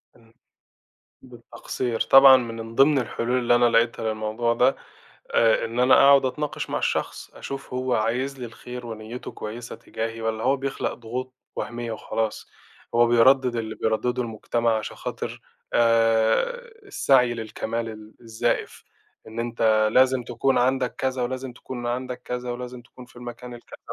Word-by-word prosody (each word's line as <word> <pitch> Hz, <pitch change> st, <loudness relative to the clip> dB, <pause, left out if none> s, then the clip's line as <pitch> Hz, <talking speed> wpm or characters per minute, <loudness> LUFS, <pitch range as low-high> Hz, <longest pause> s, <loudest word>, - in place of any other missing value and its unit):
إمم. 115 Hz, -1 st, -23 dB, 0.9 s
بالتقصير. 120 Hz, -1 st, -5 dB
طبعًا 135 Hz, -1 st, +8 dB
ما 120 Hz, -3 st, -3 dB
من 115 Hz, 0 st, -10 dB
ضمن 140 Hz, +2 st, +5 dB
الحلول 125 Hz, 0 st, -1 dB
اللي 120 Hz, -1 st, +2 dB
أنا 120 Hz, -, +4 dB
لاقيتها 115 Hz, -1 st, +2 dB
للموضوع 110 Hz, +2 st, -1 dB
ده، 125 Hz, +3 st, +3 dB, 0.5 s
آآ، 115 Hz, -1 st, +3 dB
إن 115 Hz, +2 st, -3 dB
أنا 130 Hz, +1 st, +6 dB
أقعد 140 Hz, -1 st, +6 dB
أتناقش 150 Hz, +3 st, -4 dB
مع -, -, 0 dB
الشخص، -, -, -2 dB
أشوف 135 Hz, -2 st, -7 dB
هو 130 Hz, 0 st, 0 dB
عايز 125 Hz, +5 st, -1 dB
لي 125 Hz, -, -4 dB
الخير 125 Hz, +1 st, -9 dB
ونيَّته 110 Hz, +2 st, -7 dB
كويسة 115 Hz, +3 st, -7 dB
تجاهي، 115 Hz, 0 st, -5 dB
والّا 110 Hz, 0 st, -2 dB
هو 140 Hz, -, +3 dB
بيخلق 135 Hz, 0 st, -3 dB
ضغوط 125 Hz, +2 st, -6 dB, 0.2 s
وهمية 120 Hz, -1 st, -4 dB
وخلاص، 110 Hz, 0 st, -3 dB, 0.4 s
هو 120 Hz, 0 st, +5 dB
بيردِّد 120 Hz, +1 st, +4 dB
اللي 110 Hz, -1 st, -4 dB
بيردِّده 120 Hz, +3 st, -1 dB
المجتمع، 115 Hz, 0 st, -1 dB
عشان -, -, -7 dB
خاطر -, -, -6 dB, 0.3 s
آآ، 115 Hz, -, +2 dB, 0.2 s
السعي 130 Hz, -, +3 dB
للكمال 115 Hz, 0 st, -4 dB
ال 110 Hz, -1 st, -10 dB
الزايف، 115 Hz, +1 st, -2 dB, 0.4 s
إن 110 Hz, -, -9 dB
أنت 110 Hz, -2 st, +2 dB
لازم 130 Hz, -1 st, +4 dB
تكون 130 Hz, +3 st, 0 dB
عندك 130 Hz, 0 st, +1 dB
كذا، 130 Hz, -1 st, -2 dB
ولازم 130 Hz, +1 st, -4 dB
تكون 120 Hz, 0 st, -7 dB
عندك 125 Hz, 0 st, -4 dB
كذا، 125 Hz, -1 st, -4 dB
ولازم 125 Hz, 0 st, -7 dB
تكون 125 Hz, +1 st, -14 dB
في 125 Hz, 0 st, -22 dB
المكان 120 Hz, 0 st, -8 dB
الكذا. 120 Hz, -, -13 dB
120 Hz, 150 wpm, -24 LUFS, 115-130 Hz, 0.9 s, طبعًا